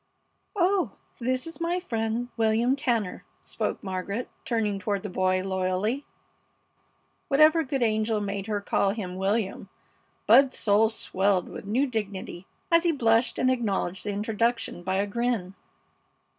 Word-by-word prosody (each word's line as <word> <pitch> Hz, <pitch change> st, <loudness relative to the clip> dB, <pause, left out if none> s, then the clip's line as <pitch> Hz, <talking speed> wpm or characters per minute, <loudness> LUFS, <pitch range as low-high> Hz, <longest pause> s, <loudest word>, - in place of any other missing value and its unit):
"Oh, 380 Hz, 0 st, +1 dB, 0.2 s
and 240 Hz, -, -5 dB
this 255 Hz, 0 st, 0 dB
is 330 Hz, +1 st, -9 dB
my 345 Hz, +2 st, 0 dB
friend, 230 Hz, -6 st, -2 dB
William 225 Hz, +3 st, +2 dB
Tanner," 235 Hz, -8 st, -1 dB, 0.2 s
spoke -, -, -4 dB
Margaret, 195 Hz, +4 st, -3 dB, 0.2 s
turning 215 Hz, -4 st, 0 dB
toward 200 Hz, 0 st, -2 dB
the 205 Hz, -, -5 dB
boy 185 Hz, 0 st, +1 dB
loyally, 190 Hz, +7 st, -1 dB, 1.2 s
(Whatever 310 Hz, +3 st, +5 dB
good 270 Hz, -2 st, -1 dB
angel 220 Hz, -1 st, +1 dB
made 200 Hz, -1 st, -3 dB
her 210 Hz, -2 st, -1 dB
call 200 Hz, 0 st, +1 dB
him 185 Hz, -5 st, -5 dB
William? 195 Hz, +1 st, -1 dB, 0.6 s
Bud's 270 Hz, -1 st, +6 dB
soul 215 Hz, +1 st, +4 dB
swelled 195 Hz, -4 st, 0 dB
with -, -, -8 dB
new 245 Hz, +7 st, +2 dB
dignity 200 Hz, -6 st, -5 dB, 0.2 s
as 335 Hz, 0 st, +6 dB
he 345 Hz, -, +3 dB
blushed 230 Hz, -4 st, +2 dB
and 255 Hz, -, +3 dB
acknowledged 205 Hz, -6 st, -1 dB
the 210 Hz, -, -3 dB
introduction 225 Hz, 0 st, -1 dB
by 185 Hz, +2 st, -1 dB
a 200 Hz, +1 st, +1 dB
grin.) 220 Hz, -3 st, -1 dB
220 Hz, 145 wpm, -27 LUFS, 195-250 Hz, 1.2 s, Bud's